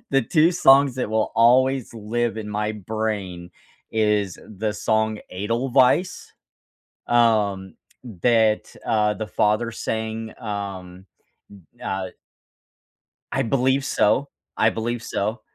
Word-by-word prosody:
the 135 Hz, -4 st, +2 dB
2 165 Hz, +1 st, +4 dB
songs 135 Hz, -5 st, +5 dB
that 125 Hz, -, -2 dB
will 110 Hz, 0 st, 0 dB
always 125 Hz, +2 st, +3 dB
live 115 Hz, +2 st, -2 dB
in 110 Hz, -1 st, -5 dB
my 105 Hz, +1 st, -2 dB
brain 100 Hz, -4 st, -4 dB, 0.4 s
is 105 Hz, -3 st, 0 dB
the 105 Hz, 0 st, -3 dB
song 110 Hz, +1 st, 0 dB
Edelweiss, 125 Hz, -, +1 dB, 0.7 s
um, 105 Hz, -5 st, +2 dB, 0.5 s
that, 110 Hz, -3 st, +2 dB
uh, 105 Hz, -1 st, +2 dB
the 110 Hz, 0 st, -5 dB
father 105 Hz, +2 st, +1 dB
sang, 110 Hz, 0 st, -4 dB
um, 95 Hz, -4 st, -6 dB, 0.7 s
n -, -, -7 dB
uh. 95 Hz, -1 st, -3 dB, 1.2 s
I -, -, +1 dB
believe 130 Hz, +2 st, +1 dB
so. 140 Hz, +5 st, +1 dB, 0.3 s
I 110 Hz, -, +4 dB
believe 115 Hz, +1 st, -3 dB
so. 105 Hz, +3 st, -3 dB
110 Hz, 110 wpm, -23 LUFS, 105-120 Hz, 1.2 s, songs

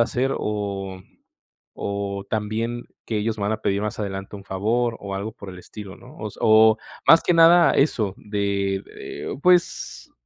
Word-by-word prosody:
hacer". 125 Hz, +3 st, +1 dB
O 100 Hz, -3 st, -3 dB, 0.8 s
o 100 Hz, -1 st, -3 dB
también 115 Hz, +3 st, -2 dB, 0.2 s
que 110 Hz, -, -2 dB
ellos 110 Hz, +1 st, -1 dB
me 100 Hz, -, -3 dB
van 100 Hz, -, 0 dB
a 110 Hz, 0 st, -3 dB
pedir 100 Hz, +1 st, 0 dB
más 105 Hz, +1 st, -4 dB
adelante 100 Hz, 0 st, -5 dB
un 100 Hz, -, -10 dB
favor, 115 Hz, +5 st, -1 dB
o 100 Hz, -1 st, -6 dB
algo 100 Hz, +3 st, -4 dB
por 100 Hz, -2 st, -11 dB
el 90 Hz, 0 st, -10 dB
estilo, 100 Hz, 0 st, -10 dB
¿no? -, -, -15 dB
O 105 Hz, 0 st, -5 dB
se -, -, -16 dB
o 110 Hz, 0 st, +6 dB, 0.3 s
más 165 Hz, -, +8 dB
que 175 Hz, -, +2 dB
nada 170 Hz, +1 st, +7 dB
eso 110 Hz, -9 st, +1 dB
de, 100 Hz, -2 st, -1 dB, 0.2 s
eh, -, -, -6 dB
pues, 180 Hz, -1 st, +1 dB
105 Hz, 175 wpm, -23 LUFS, 100-115 Hz, 0.8 s, más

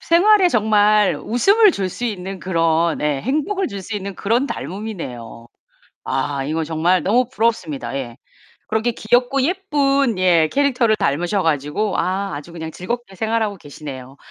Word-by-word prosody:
생활에 375 Hz, +2 st, +4 dB
정말 210 Hz, -, +3 dB
웃음을 400 Hz, -, +4 dB
줄 190 Hz, -7 st, -2 dB
수 245 Hz, -, -6 dB
있는 195 Hz, -3 st, -4 dB
그런 165 Hz, -2 st, +1 dB
예 145 Hz, -2 st, 0 dB
행복을 360 Hz, -, -1 dB
줄 200 Hz, -1 st, -7 dB
수 220 Hz, -, -6 dB
있는 200 Hz, -1 st, -6 dB
그런 235 Hz, +7 st, 0 dB
닮음이네요. 160 Hz, -, -7 dB, 0.6 s
아 135 Hz, 0 st, -2 dB
이건 160 Hz, +1 st, -2 dB
정말 165 Hz, +2 st, +1 dB
너무 240 Hz, +6 st, +3 dB
부럽습니다. 220 Hz, -, -1 dB
예. 125 Hz, -2 st, -5 dB, 0.5 s
그렇게 220 Hz, +2 st, 0 dB
귀엽고 245 Hz, +4 st, +1 dB
예쁜 280 Hz, -, +1 dB
예 175 Hz, -4 st, +4 dB
캐릭터를 255 Hz, -6 st, +2 dB
닮으셔 175 Hz, +7 st, 0 dB
가지고 160 Hz, +6 st, -1 dB
아 190 Hz, -2 st, -1 dB
아주 145 Hz, +4 st, -9 dB
그냥 160 Hz, -1 st, -6 dB
즐겁게 215 Hz, +3 st, -5 dB
생활하고 220 Hz, -1 st, -1 dB
계시네요. 140 Hz, -4 st, -10 dB
200 Hz, 325 characters per minute, -20 LUFS, 160-240 Hz, 0.6 s, 생활에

